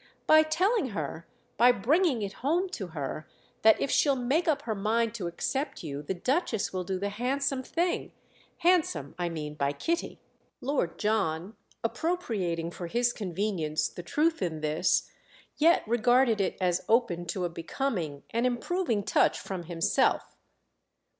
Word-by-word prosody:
"By 310 0 +7
telling 365 - +1
her, 160 +2 -4 0.3
by 245 +4 +7
bringing 265 - +2
it 195 0 -4
home 340 +8 +1
to 210 - -5
her, 155 -2 -5 0.3
that 220 0 +6
if 275 - -1
she'll 280 -2 +4
make 265 +7 0
up 295 -2 +1
her 225 - -1
mind 220 +2 0
to 200 -7 -4
accept 265 - -3
you 145 -2 -5
the 170 +6 -3
Duchess 250 - 0
will 185 -1 -2
do 190 +1 -2
the 200 +2 -2
handsome 260 +5 -1
thing. 340 +6 -1 0.5
Handsome, 335 - +2
I 175 -1 0
mean, 150 -3 -5
by 140 -1 -1
Kitty." 335 - -2 0.4
Lord 255 - -1
John, 205 -3 0 0.3
appropriating 225 - -1
for 175 0 -6
his 240 +5 +1
convenience 180 -5 -1
the - - -8
truth 315 - +1
in 160 -4 -2
this, 155 +3 +1 0.5
yet 335 +3 +5
regarded 240 -1 +3
it 195 - -1
as 180 -1 +1
open 220 -7 +2
to 180 +2 -2
a - - -1
becoming, 165 - -3
an 235 +2 +1
improving 245 - -1
touch - - +2
from 185 -3 -5
himself. 165 -1 +1
220 Hz, 155 wpm, -29 LUFS, 175-275 Hz, 0.5 s, By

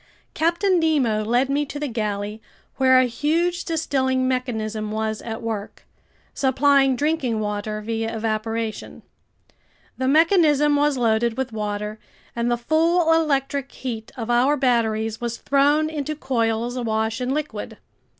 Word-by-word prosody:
Captain 345 +3 +2
Nemo 265 -10 +1
led 240 +5 +2
me 280 +2 0
to 290 0 -6
the 295 - -2
galley 210 -2 -3 0.4
where 260 -1 +5
a 255 - +5
huge 330 +8 0
distilling 260 -5 0
mechanism 220 -4 -2
was 220 0 -2
at 225 0 -6
work, 215 -3 -5 0.5
supplying 270 0 +3
drinking 275 -5 0
water 210 0 -3
via 225 +1 -3
evaporation. 225 0 -3 1.0
The 260 - 0
mechanism 300 -1 +4
was 290 -1 +2
loaded 230 0 +1
with 260 -3 -3
water, 210 0 -4 0.4
and 235 0 0
the 240 - +1
full 325 +6 +2
electric 280 -3 0
heat 230 -3 -6
of 235 -1 -3
our 260 +5 +3
batteries 225 -4 0
was 235 -1 -3
thrown 290 +2 +2
into 305 -1 -3
coils 235 -3 -1
awash 220 -1 -1
in 250 +1 -1
liquid. 300 +1 -4
250 Hz, 135 wpm, -22 LUFS, 220-290 Hz, 1.0 s, where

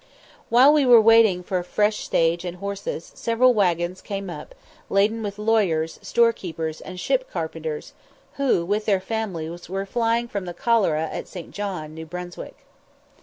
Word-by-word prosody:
While 255 +5 +7
we 300 -2 +4
were 245 -3 +8
waiting 220 -5 +5
for 185 +1 -1
a - - -4
fresh 210 +4 +1
stage 165 +1 +1
and 180 0 -5
horses, 200 -3 -5
several 245 +2 +3
waggons 180 -3 0
came 195 -3 -5
up, 150 -3 -9 0.3
laden 210 +3 +2
with 205 -1 -5
lawyers, 200 -8 +1
storekeepers, 170 -9 0
and 185 -1 -8
ship - - 0
carpenters, 470 -2 -5 0.4
who 265 -11 +2
with 210 +3 -1
their 200 -3 +2
families 180 -6 -5
were 195 +1 -3
flying 230 +2 0
from 200 -5 -4
the 175 -1 -7
cholera 195 -10 +2
at - - -5
St. 175 -4 -9
John, 185 -7 -5
New 160 0 -8
Brunswick. 180 +1 -8
195 Hz, 160 wpm, -23 LUFS, 175-225 Hz, 0.4 s, were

